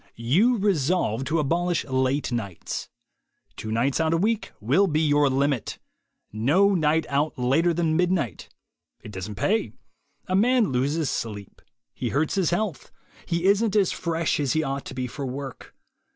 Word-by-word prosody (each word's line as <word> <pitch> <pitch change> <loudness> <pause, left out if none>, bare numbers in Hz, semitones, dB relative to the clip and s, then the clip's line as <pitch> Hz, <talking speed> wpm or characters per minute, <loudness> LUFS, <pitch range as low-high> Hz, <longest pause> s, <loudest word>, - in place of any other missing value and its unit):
You 180 - +3
resolve 170 - +1
to 160 +3 0
abolish 170 +3 0
late 130 +1 0
nights. 100 -7 -4 0.7
Two 110 - -6
nights 125 +6 +1
out 160 0 +2
a - - +2
week 220 +5 0
will 140 - +3
be 155 -2 +1
your 145 -2 +3
limit. 135 -2 0 0.6
No 155 - +3
night 160 -2 +2
out 145 +2 -1
later 135 +8 +2
than 165 -1 0
midnight. 175 - 0 0.5
It 105 - -9
doesn't 100 +2 -6
pay. 215 - 0 0.5
A 185 - -1
man 235 - +3
loses 140 +4 0
sleep. 105 -3 -6 0.3
He - - -3
hurts 150 +3 0
his 190 -5 +1
health. 175 - -2 0.4
He 170 +1 -1
isn't 205 +2 +3
as 200 -4 +3
fresh 165 -2 -1
as 140 -4 0
he 155 - +1
ought 135 -1 -3
to 130 - -8
be 130 -1 -2
for 135 +3 -6
work. 135 0 -7
150 Hz, 160 wpm, -25 LUFS, 130-180 Hz, 0.7 s, You